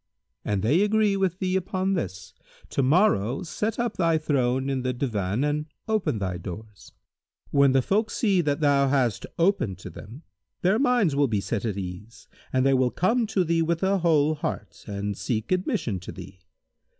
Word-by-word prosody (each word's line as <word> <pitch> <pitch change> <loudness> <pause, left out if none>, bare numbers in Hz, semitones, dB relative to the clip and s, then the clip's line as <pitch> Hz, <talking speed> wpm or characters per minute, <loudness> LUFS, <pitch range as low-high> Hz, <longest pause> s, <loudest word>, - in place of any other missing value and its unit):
An 100 -2 -1
they 145 - +3
agree 210 -1 +2
with 190 -2 0
thee 185 -1 -1
upon 190 +1 -1
this, 95 - -4 0.4
to - - 0
morrow 135 - +2
set 210 +5 -3
up 235 -2 -2
thy 165 -3 +3
throne 135 -4 0
in 135 -1 -1
the 130 -1 -2
Divan[FN#161] 110 -3 -1
and 150 +1 -1 0.2
open 215 - 0
thy 95 -3 -3
doors. 100 +3 -9 0.6
When 140 -2 +4
the 135 -1 +3
folk 215 - +1
see 195 -5 +2
that 150 -1 -1
thou 140 -2 +4
hast 130 -5 0
opened 170 - +1
to 90 - -9
them 120 +10 -11 0.4
their 190 +5 +3
minds 245 - +2
will 140 0 +3
be 110 -4 0
set 105 +2 -3
at 105 -3 -2
ease 95 +4 -8 0.2
and 130 0 +2
they 135 - +4
will 130 -1 +3
come 225 - +1
to 205 -3 +1
thee 165 0 +1
with 165 +2 0
a 195 +1 +2
whole 155 -3 +3
heart, 150 - -5
and 100 0 -3
seek 110 - -3
admission 180 - 0
to 90 - -8
thee. 95 0 -11
140 Hz, 185 wpm, -25 LUFS, 110-185 Hz, 0.6 s, When